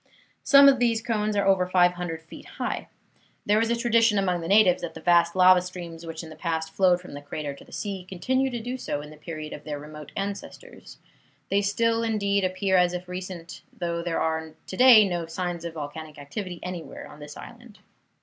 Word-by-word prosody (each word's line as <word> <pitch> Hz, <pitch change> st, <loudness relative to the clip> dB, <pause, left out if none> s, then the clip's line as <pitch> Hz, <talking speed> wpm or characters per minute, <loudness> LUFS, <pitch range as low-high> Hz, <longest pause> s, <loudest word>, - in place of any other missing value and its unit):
Some 280 Hz, 0 st, +7 dB
of 270 Hz, -2 st, +5 dB
these 235 Hz, -2 st, +2 dB
cones 215 Hz, -2 st, -1 dB
are 200 Hz, -, +1 dB
over 190 Hz, -2 st, +3 dB
500 175 Hz, -2 st, +1 dB
feet 165 Hz, -, -12 dB
high. -, -, -3 dB, 0.6 s
There 210 Hz, +2 st, +3 dB
is 230 Hz, -, 0 dB
a 235 Hz, -, +2 dB
tradition 230 Hz, -2 st, +3 dB
among 180 Hz, -3 st, +1 dB
the 165 Hz, -, -5 dB
natives 195 Hz, -2 st, +5 dB
that 170 Hz, -, -6 dB
the -, -, -7 dB
vast 170 Hz, +1 st, +3 dB
lava 185 Hz, 0 st, +6 dB
streams 170 Hz, -2 st, -8 dB
which 165 Hz, 0 st, -6 dB
in 160 Hz, -, -10 dB
the -, -, -10 dB
past 160 Hz, -1 st, -3 dB
flowed 180 Hz, -1 st, +3 dB
from 180 Hz, -, -12 dB
the 145 Hz, -, -7 dB
crater 145 Hz, 0 st, -5 dB
to 140 Hz, -, -14 dB
the -, -, -19 dB
sea 195 Hz, -3 st, -4 dB
continued 260 Hz, +8 st, 0 dB
to 240 Hz, -, -3 dB
do 250 Hz, +3 st, -5 dB
so 145 Hz, -11 st, -3 dB
in 150 Hz, +1 st, -11 dB
the -, -, -12 dB
period 155 Hz, 0 st, -7 dB
of 150 Hz, -, -9 dB
their 150 Hz, -1 st, -5 dB
remote 150 Hz, 0 st, -10 dB
ancestors. 200 Hz, -, -7 dB, 0.5 s
They 200 Hz, +1 st, +2 dB
still, 230 Hz, +3 st, +1 dB
indeed, 200 Hz, -3 st, 0 dB
appear 185 Hz, +1 st, +1 dB
as 180 Hz, 0 st, +3 dB
if 180 Hz, 0 st, -5 dB
recent, 180 Hz, -2 st, -7 dB, 0.2 s
though 170 Hz, -1 st, -2 dB
there 170 Hz, -1 st, -2 dB
are 160 Hz, -1 st, -2 dB
to -, -, -7 dB
day 235 Hz, -3 st, +8 dB
no 175 Hz, -3 st, -3 dB
signs 175 Hz, 0 st, -4 dB
of 165 Hz, -1 st, -6 dB
volcanic 155 Hz, +1 st, -7 dB
activity 175 Hz, +5 st, -6 dB
anywhere 180 Hz, -2 st, -7 dB
on 150 Hz, -, -14 dB
this 150 Hz, 0 st, -10 dB
island. 240 Hz, -2 st, -12 dB
180 Hz, 210 wpm, -26 LUFS, 165-205 Hz, 0.6 s, day